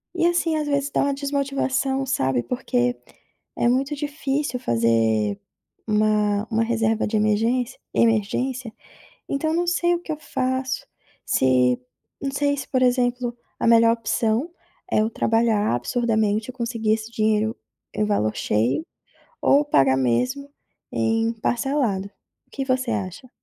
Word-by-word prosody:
e 340 Hz, -1 st, +2 dB
assim, 345 Hz, -2 st, +2 dB
às 300 Hz, -, -1 dB
vezes 285 Hz, 0 st, 0 dB
dá -, -, +1 dB
uma 280 Hz, 0 st, +1 dB
desmotivação, 275 Hz, -1 st, -1 dB
sabe, 130 Hz, -, 0 dB
porque 245 Hz, -, -1 dB, 0.6 s
é -, -, +1 dB
muito 270 Hz, +4 st, +1 dB
difícil 285 Hz, -2 st, -2 dB
fazer 115 Hz, -, +1 dB, 0.5 s
uma 210 Hz, 0 st, +2 dB
uma 225 Hz, +1 st, +2 dB
reserva 225 Hz, -1 st, +1 dB
de 220 Hz, -, -2 dB
emergência 230 Hz, +4 st, +1 dB
emergência, 230 Hz, +2 st, 0 dB, 0.6 s
então 300 Hz, +3 st, -1 dB
eu 325 Hz, -, 0 dB
não 350 Hz, 0 st, +1 dB
sei 345 Hz, 0 st, +2 dB
o -, -, -1 dB
que 320 Hz, -, -5 dB
eu -, -, -3 dB
faço, 260 Hz, -1 st, -2 dB, 0.4 s
se, 125 Hz, -1 st, +3 dB, 0.5 s
não 275 Hz, -, -1 dB
sei 285 Hz, 0 st, +1 dB
se 270 Hz, -, -6 dB
por 255 Hz, -1 st, +1 dB
exemplo, 245 Hz, -1 st, +1 dB, 0.2 s
a -, -, -1 dB
melhor 230 Hz, 0 st, +6 dB
opção 230 Hz, +4 st, 0 dB, 0.4 s
é -, -, +3 dB
eu 220 Hz, +1 st, +1 dB
trabalhar 225 Hz, -, +1 dB
absurdamente, 220 Hz, -, 0 dB
eu 255 Hz, -, -12 dB
conseguir 230 Hz, -3 st, -1 dB
esse 220 Hz, 0 st, -6 dB
dinheiro, 220 Hz, 0 st, +1 dB, 0.4 s
eh, -, -, 0 dB
o -, -, +2 dB
valor 110 Hz, -, 0 dB
cheio, 115 Hz, -, 0 dB, 0.6 s
ou 285 Hz, +1 st, +4 dB
pagar 135 Hz, -, +4 dB
mesmo 250 Hz, -, 0 dB, 0.4 s
em 225 Hz, +1 st, +1 dB
parcelado, 235 Hz, -4 st, -1 dB, 0.4 s
o -, -, -40 dB
que 270 Hz, -1 st, -3 dB
você 255 Hz, -2 st, 0 dB
acha? 215 Hz, +4 st, -4 dB
235 Hz, 145 wpm, -23 LUFS, 215-270 Hz, 0.6 s, melhor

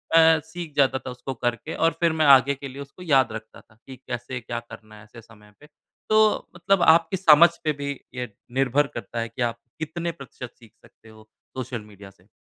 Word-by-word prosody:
अ, 160 Hz, -1 st, +6 dB
सीख 160 Hz, -2 st, -8 dB
जाता 135 Hz, -1 st, +3 dB
था -, -, -4 dB
उसको 130 Hz, +2 st, -6 dB
करके 120 Hz, +6 st, -3 dB
और 165 Hz, +1 st, +2 dB
फिर 170 Hz, -1 st, +3 dB
मैं 155 Hz, -1 st, +1 dB
आगे 135 Hz, 0 st, +6 dB
के 140 Hz, +1 st, -8 dB
लिए 135 Hz, +2 st, -9 dB
उसको 140 Hz, +6 st, -11 dB
याद 135 Hz, -7 st, +3 dB
रखता 110 Hz, 0 st, -9 dB
था 110 Hz, -, -27 dB
कि 130 Hz, -, -9 dB
कैसे 125 Hz, +1 st, -5 dB
क्या 120 Hz, +1 st, -5 dB
करना 110 Hz, 0 st, -13 dB
है 105 Hz, -, -14 dB
ऐसे 115 Hz, +2 st, -14 dB
समय 105 Hz, -2 st, -19 dB
पे। 150 Hz, -, -17 dB, 0.4 s
तो, 215 Hz, 0 st, +3 dB
मतलब 185 Hz, +2 st, +1 dB
आपकी 165 Hz, +3 st, +4 dB
समझ 170 Hz, -1 st, +7 dB
पे 155 Hz, -1 st, +1 dB
भी 140 Hz, -, -3 dB, 0.3 s
ये 125 Hz, -2 st, -4 dB, 0.3 s
निर्भर 135 Hz, +2 st, +2 dB
करता 115 Hz, -, -6 dB
है 115 Hz, 0 st, -3 dB
कि 115 Hz, -, -8 dB
आप 115 Hz, -1 st, -1 dB, 0.2 s
कितने 170 Hz, +2 st, -3 dB
प्रतिशत 135 Hz, -5 st, -10 dB
सीख 115 Hz, -3 st, -18 dB
सकते 110 Hz, -, -20 dB
हो 110 Hz, 0 st, -17 dB, 0.3 s
सोशल 125 Hz, -3 st, -5 dB
मीडिया 100 Hz, -2 st, -14 dB
से। 95 Hz, +1 st, -28 dB
135 Hz, 215 wpm, -24 LUFS, 115-160 Hz, 0.4 s, समझ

